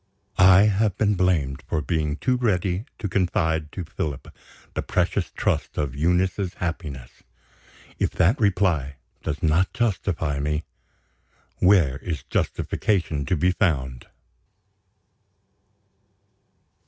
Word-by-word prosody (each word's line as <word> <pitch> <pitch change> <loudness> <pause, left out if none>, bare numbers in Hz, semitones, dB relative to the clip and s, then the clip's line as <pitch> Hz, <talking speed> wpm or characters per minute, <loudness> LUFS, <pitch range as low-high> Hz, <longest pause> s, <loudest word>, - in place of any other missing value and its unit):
'" - - -35 0.2
I - - +6
have 105 -1 +2
been 105 -1 +2
blamed 85 -8 +1
for 80 - 0
being 75 -2 -1
too 125 +10 0
ready 100 -4 0
to 105 - -3
confide 85 -5 0
to 90 - -4
Philip 75 -3 -5 0.4
the - - -2
precious - - 0
trust - - -2
of 70 -4 -2
Eunice's 90 +4 0
happiness. 75 -8 -5 0.8
If - - +2
that 95 - +3
reply 90 -9 +1 0.3
does 80 +3 -4
not 80 +4 +2
justify 90 - -1
me, 75 +2 -1 0.9
where 90 -9 +4
is 80 -6 -4
justification 80 -9 -1
to - - +2
be 90 +4 +2
found? 65 -10 -1
85 Hz, 115 wpm, -24 LUFS, 75-95 Hz, 0.9 s, I